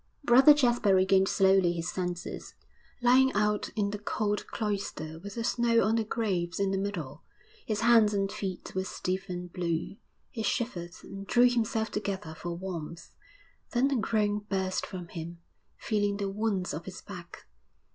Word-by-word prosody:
Brother 270 +4 +8
Jasper 240 -8 +3
regained 190 +1 +4
slowly 190 -3 +4
his 170 0 -3
senses, 180 -1 -5 0.5
lying 260 +2 +5
out 210 0 +1
in 205 -2 0
the 210 - -4
cold 210 0 -2
cloister 195 -7 -4
with 200 +3 -9
the 230 - -2
snow 235 0 +2
on 215 +3 +2
the 225 - +1
graves 195 -6 -2
in 195 -1 +1
the 195 - 0
middle; 185 -9 -4 0.5
his 215 -2 -1
hands 230 -2 +6
and 195 -1 0
feet 190 -3 -5
were 190 - -1
stiff 190 +1 -3
and 180 -1 -6
blue. 170 +1 -2 0.3
He 225 - -5
shivered 200 -6 -2
and 195 0 -9
drew 245 +1 +5
himself 225 -2 0
together 195 -5 -3
for 170 +2 -5
warmth, 170 -3 -6 0.6
then 265 +3 +2
a - - +2
groan 210 -2 +1
burst 190 -1 -1
from 180 -2 -7
him, 170 0 -7 0.4
feeling 205 -2 0
the 200 -1 -2
wounds 200 -3 -1
of 155 +3 -6
his 190 -1 -8
back. 180 -4 -10
200 Hz, 165 wpm, -29 LUFS, 180-220 Hz, 0.6 s, Brother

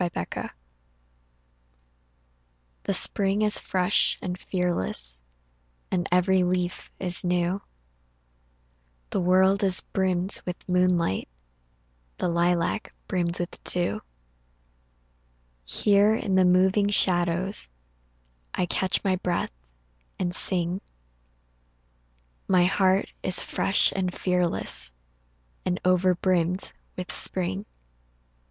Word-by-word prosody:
MAY 175 - -1
NIGHT 85 - -5 2.3
THE - - 0
spring 200 +1 +5
is 210 0 +6
fresh 185 +1 +1
and 180 -1 -4
fearless 95 - +1 0.7
And 180 -2 -1
every 185 +1 +3
leaf 180 0 -2
is 180 -2 -2
new, 180 +2 -1 1.5
The - - -1
world 190 +2 +3
is 190 -2 +3
brimmed 185 0 -1
with 180 -1 -7
moonlight, 180 - 0 0.9
The - - -1
lilac 170 +4 -1
brimmed 175 -2 -1
with 175 0 -6
dew. 175 - 0 1.7
Here 205 - +3
in 195 - -3
the 185 -1 +4
moving 190 +3 +3
shadows 180 - +1 0.9
I - - 0
catch 185 +1 0
my 190 -2 +1
breath 180 -1 -2 0.7
and 175 -1 -2
sing 180 0 +2 1.7
My 185 -2 +3
heart 190 +1 +1
is 185 - +4
fresh 195 - +1
and 185 -2 -1
fearless 175 - +1 0.7
And 180 0 -2
over 185 0 +3
brimmed 180 0 0 0.2
with 180 0 -5
spring. 190 +2 -3
180 Hz, 95 wpm, -25 LUFS, 175-190 Hz, 2.3 s, is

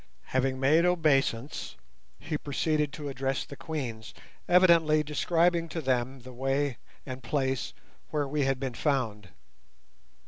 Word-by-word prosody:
Having 130 0 +1
made 150 +5 +4
obeisance 145 -7 +1 0.4
he 155 0 -4
proceeded 150 0 0
to 150 - -6
address 135 0 -2
the 140 - -10
Queens, 125 -9 -5 0.3
evidently 170 -4 +5
describing 170 +3 +1
to 165 - -4
them 130 -2 -1
the 130 +1 -11
way 135 +1 0 0.3
and 130 -1 -6
place 130 0 -1 0.4
where 145 -2 -1
we 145 +2 -1
had 135 -1 0
been 130 -2 -3
found. 115 - -1
140 Hz, 130 wpm, -29 LUFS, 130-155 Hz, 0.4 s, evidently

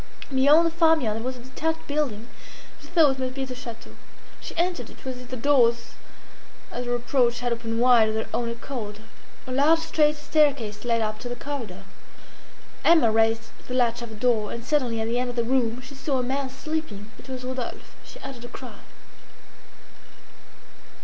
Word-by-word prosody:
Beyond 285 +5 +6
the 330 - +2
farmyard 320 -10 +3
there 225 - -5
was 255 +1 -3
a - - -11
detached 320 +5 -3
building 285 -8 -1
that - - -18
she - - -13
thought 300 -6 +4
must 255 0 -3
be 270 -1 -2
the 260 - -6
château 235 -2 -9 0.5
She - - -9
entered 350 +1 0
it - - -16
was 255 -1 -4
if 250 - -11
the 255 - -5
doors 235 -3 +3 0.8
at 245 0 -4
her 245 - +1
approach 245 0 +1
had 245 -1 +1
opened 230 -1 -3
wide 240 -3 +6
of 215 - -2
their 220 - -1
own 235 -1 0
accord. 230 -3 -6 0.4
A 255 - -7
large 290 +5 +5
straight 310 -2 +2
staircase 280 -9 +1
led 230 -1 +2
up 215 0 -2
to 245 - -6
the 245 - -3
corridor. 235 -9 -6 1.0
Emma 310 -10 +6
raised 225 +1 +2 0.2
the 250 - -3
latch 240 -1 +2
of 235 -1 -7
a - - -8
door, 220 -2 +1
and 235 0 -6
suddenly 250 -6 +1
at 220 - -1
the 235 +2 0
end 250 0 -1
of 245 - -5
the 235 - +1
room 245 -1 +1
she 270 - -11
saw 275 0 -1
a 250 - 0
man 265 +2 -1
sleeping. 265 -7 -5
It - - -13
was 255 -1 -5
Rodolphe. 255 -1 -5
She - - -12
uttered 245 -3 -8
a - - -6
cry. 250 +1 -10
250 Hz, 195 wpm, -25 LUFS, 230-280 Hz, 1.0 s, Beyond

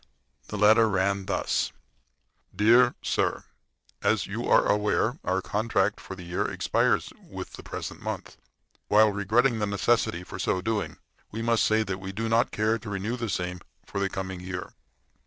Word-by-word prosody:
The 105 - -5
letter 110 +2 +5
ran 100 0 0
thus: 100 - 0 0.8
DEAR 120 +5 +5
SIR: - - 0 0.6
As - - +2
you - - -4
are - - +5
aware, 105 +5 +1
our 95 0 0
contract 105 -1 0
for 95 - -8
the 90 - -10
year 85 +1 -1
expires - - +1
with - - -8
the - - -9
present - - -7
month. - - -5 0.5
While 105 +1 +5
regretting 110 +4 +2
the 105 - 0
necessity 100 -3 +1
for - - -9
so 95 - 0
doing, 100 -5 -2 0.3
we 115 +2 -5
must 115 -1 +2
say 110 0 +3
that 95 -2 -4
we 95 0 -6
do 115 +4 -3
not 115 +2 +3
care 110 +2 0
to 110 - -8
renew 100 +4 -2
same 90 -2 -3 0.3
for 100 - -4
the 100 0 0
coming 95 -1 -5
year. 90 0 -6
105 Hz, 165 wpm, -27 LUFS, 95-110 Hz, 0.8 s, letter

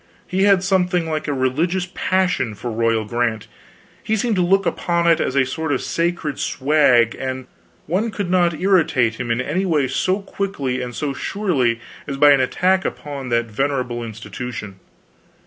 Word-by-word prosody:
He 190 +2 +1
had 195 -2 +4
something 180 -3 +1
like 155 -1 -3
a - - 0
religious 155 +8 0
passion 185 - 0
for 120 +3 -5
royal 115 -1 +1
grant; 115 -1 -1 0.6
he 220 - 0
seemed 220 +1 0
to - - +3
look 195 +2 +3
upon 170 -1 0
it 170 -1 +4
as 130 - -1
a 135 -1 +4
sort 160 +4 -3
of 130 - +1
sacred 170 -3 -2
swag, 130 -5 +3
and 130 -1 -4 0.4
one 190 +8 0
could 205 -3 -3
not 175 -4 +2
irritate 155 - +2
him 125 -1 -3
in 115 +1 +1
any 150 +9 -1
way 155 -7 +1
so 185 +8 0
quickly 145 -11 -3
and 125 -1 -5
so 145 -2 -2
surely 140 - 0 0.3
as 140 -1 -4
by 145 +1 +7
an 140 -2 +5
attack 185 +8 +2
upon 140 -3 -5
that 115 0 +1
venerable 125 -1 -1
institution. 110 -2 -7
145 Hz, 170 wpm, -20 LUFS, 125-180 Hz, 0.6 s, by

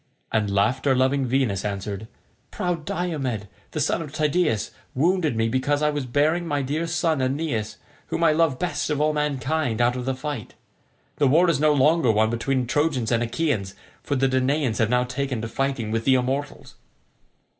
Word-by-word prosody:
And 110 -2 +1
laughter 125 +7 +2
loving 130 +1 +2
Venus 120 -7 0
answered, 100 +1 -4 0.4
"Proud 175 -4 -3
Diomed, 135 - -2 0.2
the - - -4
son - - +1
of 150 -3 -7
Tydeus, 150 - 0 0.2
wounded 160 -1 +2
me 115 0 +1
because 145 +5 0
I 150 - +3
was 145 -3 -3
bearing 155 +7 +1
my 145 -3 0
dear 155 +5 -2
son 165 -3 0
Aeneas, 130 -4 -2 0.3
whom 170 - -2
I 165 - +5
love 155 -4 +2
best 180 0 -2
of 150 -1 0
all 155 +1 +2
mankind, 145 -3 -1
out 120 0 +3
of 125 -1 -4
the 130 0 -1
fight. 135 -4 -6 0.6
The 145 - +3
war 165 +7 +4
is 145 - -1
no 155 0 +4
longer 145 -2 +4
one 110 +1 +2
between 125 +2 0
Trojans 130 -2 0
and 115 -1 +2
Achaeans, 115 -6 -1 0.3
for 145 - -2
the 135 0 +2
Danaans 130 -1 0
have 110 -2 +2
now 125 +1 +3
taken 130 0 -3
to - - -2
fighting 130 -2 -2
with 115 0 -1
the 130 - +5
immortals." 135 +3 -2
135 Hz, 180 wpm, -24 LUFS, 120-150 Hz, 0.6 s, I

